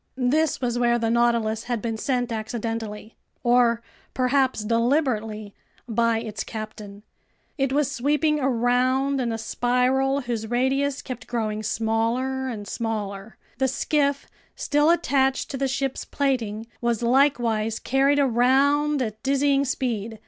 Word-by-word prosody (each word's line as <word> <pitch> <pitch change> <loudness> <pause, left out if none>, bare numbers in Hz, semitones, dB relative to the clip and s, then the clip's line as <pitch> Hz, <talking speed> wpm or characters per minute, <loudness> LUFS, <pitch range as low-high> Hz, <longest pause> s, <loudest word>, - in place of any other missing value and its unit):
This 280 +4 +1
was 240 -1 -1
where 240 0 +3
the 225 -1 0
Nautilus 235 -2 +1
had 240 -2 -2
been 225 +1 -3
sent 245 +1 -1
accidentally—or 230 +1 -1 0.3
perhaps 260 -3 +1
deliberately—by 230 -2 -1
its 220 -2 -5
captain. 210 -2 -8 0.5
It 270 -2 0
was 285 0 +1
sweeping 300 +3 +1
around 255 +2 +1
in 235 -2 -1
a 225 - -2
spiral 250 +4 +1
whose 235 -3 -3
radius 265 +3 0
kept 250 -3 -7
growing 215 -3 -2
smaller 230 +5 -1
and 210 -5 -5
smaller. 210 -2 -4 0.2
The 265 - +3
skiff, 280 +1 0 0.3
still 295 +1 +2
attached 270 -5 +1
to 275 - -4
the 270 +1 0
ship's 270 0 -2
plating, 230 -6 -1 0.2
was 235 -1 0
likewise 235 -4 +2
carried 275 +2 +2
around 275 +3 +3
at 220 -1 -6
dizzying 275 0 +2
speed. 230 -5 -3
245 Hz, 125 wpm, -24 LUFS, 225-270 Hz, 0.5 s, where